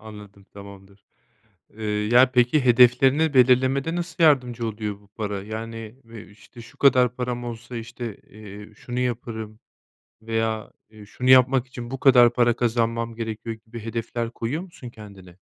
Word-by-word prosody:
Anladım, 105 -2 -13
tamamdır. 100 0 -14 0.7
Eee, 110 - -8
ya, 110 +5 +3
peki, 125 +3 +2
hedeflerini 130 +5 +4
belirlemede 130 +4 +3
nasıl 175 -1 -3
yardımcı 125 -6 +2
oluyor 105 -2 -5
bu 100 - -24
para? 100 -1 -5
Yani, 115 +1 -7
eee, 115 -2 -12
işte, 115 +3 -16
"Şu 115 - -16
kadar 125 -3 +3
param 125 -1 -4
olsa, 120 +1 -8
işte, 115 -1 -7
eee, 105 0 -13
şunu 125 +3 -6
yaparım." 110 -3 -4 0.6
veya, 110 -1 -3 0.2
eee, 105 -2 -14
"Şunu 125 +4 -2
yapmak 130 0 +5
için 120 -2 -9
bu 135 0 -6
kadar 125 -3 +6
para 120 -1 +2
kazanmam 115 -1 -1
gerekiyor." 115 0 -6
gibi 115 +1 -9
hedefler 115 0 -4
koyuyor 125 +9 -4
musun 170 -9 -11
kendine? 95 -5 -14
115 Hz, 145 wpm, -23 LUFS, 110-125 Hz, 0.7 s, kadar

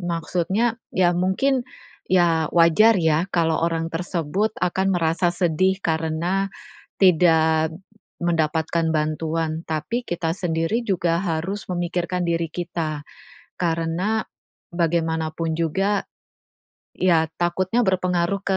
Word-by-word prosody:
maksudnya 180 +6 -1 0.2
ya 175 -1 +3
mungkin, 240 +9 +1 0.4
ya 170 -4 +3
wajar 175 +7 +6
ya 160 +1 +2
kalau 165 -2 +2
orang 165 -1 0
tersebut 175 +4 -1
akan 190 +2 +1
merasa 165 +1 +1
sedih 185 +2 +1
karena 165 +4 0 0.6
tidak 160 -3 +4 0.5
mendapatkan 165 0 0
bantuan, 155 +1 -1
tapi 160 +10 -2
kita 170 -1 -2
sendiri 175 +5 -1
juga 170 -4 +1
harus 185 +3 -3
memikirkan 175 0 -2
diri 170 0 0
kita 165 -3 -4 0.6
karena 170 +6 0 0.5
bagaimanapun 160 -1 -1
juga 195 +5 0 0.9
iya 170 -3 +3
takutnya 185 +7 +1
berpengaruh 180 0 +1
ke 195 -1 0
170 Hz, 100 wpm, -23 LUFS, 160-185 Hz, 0.9 s, wajar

